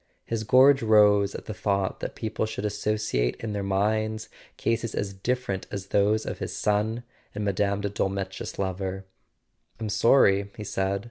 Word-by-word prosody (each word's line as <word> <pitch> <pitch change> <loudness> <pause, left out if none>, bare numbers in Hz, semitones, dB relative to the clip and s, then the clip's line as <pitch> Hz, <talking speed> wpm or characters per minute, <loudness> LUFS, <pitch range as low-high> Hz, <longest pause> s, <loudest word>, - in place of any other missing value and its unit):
His 115 -1 -2
gorge 130 +4 +6
rose 105 -2 +4
at - - -7
the 110 - -5
thought 100 -2 -1
that - - -5
people 110 0 -2
should 105 -1 -4
associate 105 - 0
in 110 -2 -5
their 100 - -2
minds 110 +3 0 0.3
cases 115 -1 -1
as 100 -1 -2
different 100 -1 -2
as 100 -1 -6
those 105 +2 +2
of - - -5
his - - -4
son 105 +3 0 0.3
and 105 0 -2
Mme. 100 - +1 0.3
de 100 - -1
Dolmetsch's 95 -1 -3
lover. 95 0 -3 0.7
"I'm 110 -2 -3
sorry," 100 -2 +4
he 105 - -5
said. 100 -1 -1
105 Hz, 160 wpm, -26 LUFS, 100-110 Hz, 0.7 s, gorge